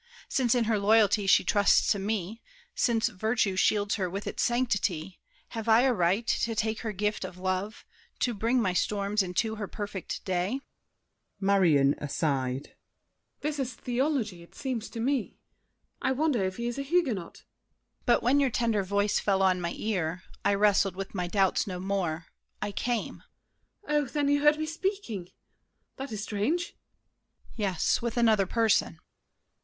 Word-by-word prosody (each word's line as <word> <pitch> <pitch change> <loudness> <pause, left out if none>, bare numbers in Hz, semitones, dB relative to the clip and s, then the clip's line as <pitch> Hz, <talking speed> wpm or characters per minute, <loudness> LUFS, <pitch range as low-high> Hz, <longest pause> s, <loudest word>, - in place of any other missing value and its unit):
Since 255 -3 +2
in 245 - +3
her 220 -2 +1
loyalty 205 -1 +4
she - - +6
trusts 205 -1 +3
to 205 - +1
me, 210 +1 -3 0.3
Since 230 -2 +2
virtue 220 -1 0
shields 205 +2 +2
her 185 - 0
with 195 +3 -5
its - - -3
sanctity, 200 -8 0 0.3
Have 225 -1 -4
I 225 +2 +7
a 260 0 +3
right 195 +3 +1
to 230 0 0
take 220 +1 -1
her 225 - -3
gift 210 +1 -1
of 185 -1 -7
love, 185 +3 -3 0.4
To 245 - +1
bring 230 +4 +1
my 185 -6 +1
storms 200 +2 0
into 195 +4 -1
her 205 -2 -4
perfect 205 -3 -6
day?" 190 +8 -1 0.8
MARION 175 -9 +4
(aside). 135 -3 -2 0.7
This 300 -1 -2
is 255 -3 -3
theology, 245 - -1
it 170 - -17
seems 245 -5 -4
to 230 - -7
me! 255 0 -1 0.6
I 260 - +1
wonder 275 -6 +1
if 185 0 -2
he 235 - -3
is 240 +3 -3
a - - 0
Huguenot? 275 - 0
DIDIER. - - -18 0.6
But 240 - +4
when 260 +4 +4
your 275 -2 +3
tender 230 -3 +1
voice 200 +2 +1
fell 195 -1 +1
on 185 -1 +3
my 170 0 -3
ear, 180 -5 -2 0.2
I 200 0 +3
wrestled 200 -2 +3
with 195 0 -6
my 180 -3 -2
doubts 195 +1 +1
no 180 -2 -4
more—I 190 +1 -4
came. 230 +4 -2 0.6
MARION. 295 0 +2
Oh, - - -5
then 285 +2 0
you 285 0 +3
heard 295 +1 +5
me 310 - -2
speaking—that 295 - -6
is 215 -2 -4
strange! 245 - -1
DIDIER. - - -29 0.8
Yes; 195 -6 +1
with 235 0 -3
another 220 -5 +4
person. 220 -6 +2
210 Hz, 165 wpm, -28 LUFS, 190-240 Hz, 0.8 s, I